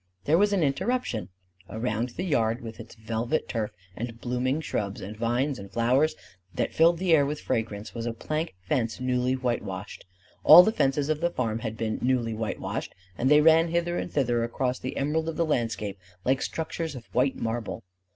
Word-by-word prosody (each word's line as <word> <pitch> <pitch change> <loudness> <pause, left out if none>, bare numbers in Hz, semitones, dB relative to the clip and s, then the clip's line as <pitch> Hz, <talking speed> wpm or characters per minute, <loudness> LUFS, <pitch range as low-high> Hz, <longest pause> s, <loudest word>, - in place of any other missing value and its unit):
There 160 +4 +4
was 205 0 +4
an 195 -5 +2
interruption. 140 - -1 0.4
Around 115 +1 -2
the 180 - -1
yard 115 -8 +1
with 115 -1 -8
its - - -10
velvet 115 +6 -2
turf 110 -3 -2 0.3
and 115 0 -5
blooming 125 +4 -1
shrubs 100 -10 -3
and 105 +3 -7
vines 120 +4 0
and 100 0 -9
flowers, 125 +8 +2 0.4
that - - -1
filled 165 +1 +5
the 180 -1 +2
air 150 -3 +6
with 145 +2 -2
fragrance, 110 -2 -3
was 115 0 -4
a - - 0
plank 155 - -3
fence 115 0 0
newly 125 0 +1
whitewashed. 120 -6 -4 0.4
All 165 +4 +11
the 220 - +2
fences 140 -6 +1
of 155 0 0
the 175 - +2
farm 115 -8 -2
had 110 -1 -5
been 110 -1 -2
newly 125 -3 +1
whitewashed; 110 0 -4 0.2
and 130 +8 +1
they 150 0 +7
ran 165 +1 +6
hither 170 +1 0
and - - -5
thither 120 -4 +1
across 125 +2 -1
the 130 - -5
emerald 160 +3 0
of 165 - -5
the 170 - +2
landscape 115 -8 -1 0.3
like 130 +1 +2
structures 160 -1 -3
of 120 -3 -9
white 130 +2 +2
marble. 115 0 -3
125 Hz, 190 wpm, -27 LUFS, 115-155 Hz, 0.4 s, All